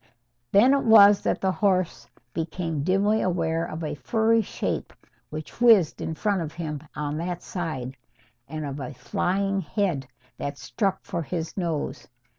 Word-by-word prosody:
Then 240 +7 +6
it 280 - +2
was 205 -3 +8
that - - -1
the 190 - +2
horse 185 -3 0 0.3
became 165 -2 -3
dimly 195 +6 +2
aware 165 -2 0
of 165 -1 -5
a 150 -1 -2
furry 220 - +2
shape 210 - -3 0.4
which 155 +8 -8
whizzed 220 -10 +5
in 160 - -3
front 200 +1 0
of 155 -1 -5
him 155 -4 -4
on 150 +1 -3
that 175 +1 -4
side, 145 -8 -4 0.5
and 155 +1 -5
of 140 0 -5
a 130 -3 -6
flying 195 +1 0
head 165 - -1 0.3
that 140 0 -4
struck 195 +1 -2
for 170 - -3
his 165 +1 -4
nose. 170 -5 -3
175 Hz, 155 wpm, -25 LUFS, 155-200 Hz, 0.5 s, was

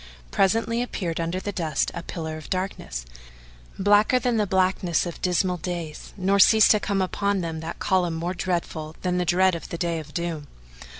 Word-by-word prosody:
Presently 225 +4 +2
appeared 180 -9 -3
under 170 +2 -1
the 205 +2 -4
dust 160 -7 -1
a - - -5
pillar 160 -2 -5
of 155 -1 -9
darkness, 185 - -3 0.7
blacker 205 +5 +4
than 245 -1 +1
the 210 -1 +1
blackness 185 -3 +1
of 175 - -7
dismal 180 0 +1
days; 170 -3 -5
nor 195 +1 +2
ceased 220 +2 +7
to 210 - +5
come 200 -2 0
upon 200 +1 0
them 165 -2 -4
that 160 +1 -6
column 180 -3 +1
more 170 +3 -2
dreadful 165 -3 -3
than 180 -1 0
the 180 - 0
dread 185 +2 +3
of 170 - -5
the 170 - -4
Day 170 -1 -1
of 155 -1 -10
Doom. 165 -3 -3
180 Hz, 185 wpm, -25 LUFS, 165-195 Hz, 0.7 s, ceased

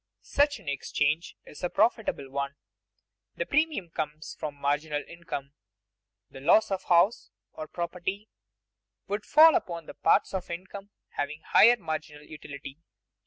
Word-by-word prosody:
Such 285 0 +2
an - - -19
exchange 150 +3 -1
is - - -13
a 180 - +1
profitable 220 - +1
one. 140 0 -3 0.8
The - - -2
premium 300 - 0
comes 155 -1 -5
from 150 -2 -4
marginal 145 +1 -1
income; 155 -5 -7 0.7
the - - -12
loss 185 +9 +4
of 190 -1 -2
house 175 +6 +3 0.2
or 155 - -7
property 180 +5 -4 0.8
would 205 +1 -3
fall 320 +2 +8
upon 170 - -2
the - - -9
parts 205 - +2
of 190 -2 -4
income 195 +3 -7 0.2
having 150 +2 -4
higher 240 +2 +6
marginal 155 -6 -5
utility. 140 -2 -10
170 Hz, 135 wpm, -28 LUFS, 150-200 Hz, 0.8 s, fall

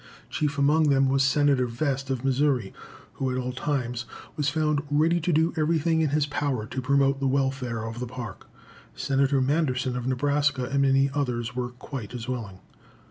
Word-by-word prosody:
Chief 145 -2 -1
among 150 +3 +4
them 135 -1 +3
was 135 0 +2
Senator 140 -2 +3
Vest, 135 +2 -2
of 130 -1 -2
Missouri, 135 -5 +1 0.4
who 135 - -2
at 130 - -2
all 125 0 -2
times 125 -3 -2 0.3
was 145 -1 +1
found 150 -1 +1
ready 160 +4 +3
to 170 +2 0
do 160 +1 +2
everything 160 0 +2
in 155 - +2
his 150 +1 +1
power 145 -6 -2
to 130 +3 -4
promote 140 +1 +2
the 135 - 0
welfare 130 -4 -1
of 115 +1 -6
the 125 - -3
Park. 120 -4 -8 0.5
Senator 135 0 +1
Manderson, 130 -3 0
of 125 0 -3
Nebraska, 140 +1 +1
and 140 +3 0
many 135 0 +3
others 125 -4 -2
were 125 -1 -2
quite 125 -1 -8
as 120 -1 -6
willing. 110 -7 -5
135 Hz, 180 wpm, -26 LUFS, 125-145 Hz, 0.5 s, among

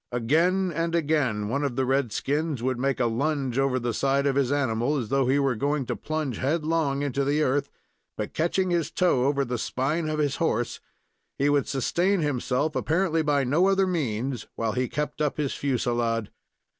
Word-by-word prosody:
Again 170 +10 +2
and 165 +1 -1
again, 140 -10 +1
one 140 +6 -1
of 135 -4 -1
the 130 0 +1
red 135 -2 +1
skins 145 +1 -1
would 130 -1 -1
make 135 +1 0
a 125 - +2
lunge 135 +2 0
over 135 -1 +2
the 120 -1 -2
side 140 +4 +1
of 140 -1 +1
his 140 -2 +1
animal, 140 0 +1
as 120 -6 -3
though 135 -2 +2
he 135 +2 +3
were 135 -2 +2
going 140 +3 -1
to - - -2
plunge 155 -6 -3
headlong 150 -1 0
into 140 -1 -1
the 145 +3 +1
earth; 140 +1 0 0.5
but, - - -4
catching 180 +3 0
his 170 -3 +1
toe 165 -9 +2
over 140 0 +1
the 120 -1 -3
spine 155 +8 -1
of 155 - -1
his 145 -2 0
horse, - - -1 0.6
he 140 +1 +2
would 145 -1 +2
sustain 175 +9 +1
himself 145 +1 -1
apparently 165 0 +1
by 145 -2 +2
no 155 +9 +3
other 195 0 +3
means, 130 - -2
while 115 -1 -1
he 125 +2 -1
kept 150 0 -3
up 150 -2 0
his 145 -3 -1
fusilade. 120 -4 -1
140 Hz, 195 wpm, -26 LUFS, 125-155 Hz, 0.6 s, he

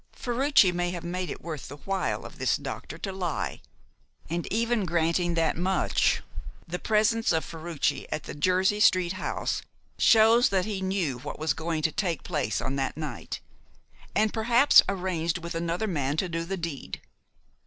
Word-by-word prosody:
Ferruci 245 -5 +3
may 175 0 -1
have 175 -1 -5
made 180 +1 -3
it - - -7
worth 155 -4 -6
the - - -8
while 195 +5 -2
of - - -11
this - - +2
doctor - - -7
to 195 - -4
lie. 180 -5 -3 0.7
And 170 0 -3
even 230 +1 +1
granting 170 0 +1
that 165 -1 +2
much, 185 +3 +1 0.4
the 180 +2 -4
presence 220 +1 +2
of 160 -3 +1
Ferruci 160 -4 -2
at 155 - -2
the - - -7
Jersey 185 +6 +2
Street 185 -4 +4
house 185 - -2 0.4
shows 225 +2 +6
that 190 -2 +1
he 205 -3 -3
knew 185 -9 -1
what 140 - -6
was 155 -2 0
going 160 +1 -3
to 160 - +2
take 180 -3 -2
place 130 - -1
on 135 - -2
that 135 +1 -2
night, 155 -2 -5 0.7
and 215 0 +2
perhaps 240 +5 +6
arranged 180 -3 -1
with 170 -1 -6
another 170 +4 -1
man 145 -7 -1
to 185 - +1
do 165 -1 -3
the 195 +2 -3
deed. 165 -5 -5
175 Hz, 170 wpm, -27 LUFS, 160-195 Hz, 0.7 s, shows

